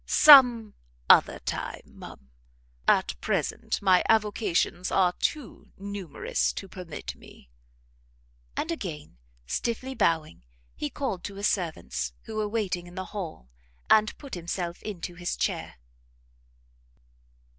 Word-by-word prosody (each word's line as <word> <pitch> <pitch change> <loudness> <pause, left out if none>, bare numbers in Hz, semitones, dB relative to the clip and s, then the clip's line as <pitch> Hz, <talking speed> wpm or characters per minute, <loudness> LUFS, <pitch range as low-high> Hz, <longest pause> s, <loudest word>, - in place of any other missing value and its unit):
"Some 245 -7 +8 0.4
other - - +5
time, - - -5
ma'am; 65 -1 -13 0.6
at - - +3
present - - -1
my 185 -2 +5
avocations 210 -5 +1
are 180 -2 +3
too 295 +4 -3
numerous 200 -5 -2
to 195 - -7
permit 180 -4 -8
me." 65 - -17 1.1
And 325 - -1
again, 155 - -6 0.3
stiffly 235 - -3
bowing, 160 - 0 0.3
he 145 - -3
called 200 - -4
to 200 - -6
his 200 +1 0
servants, 160 - -2
who 220 - -7
were 210 -1 -1
waiting 195 -5 -2
in 175 - -13
the 185 -1 -4
hall, 160 - -6 0.4
and 215 0 +4
put 280 -3 -12
himself 175 0 -4
into 180 -4 -6
his 175 0 -4
chair. - - -2
190 Hz, 120 wpm, -27 LUFS, 170-215 Hz, 1.1 s, Some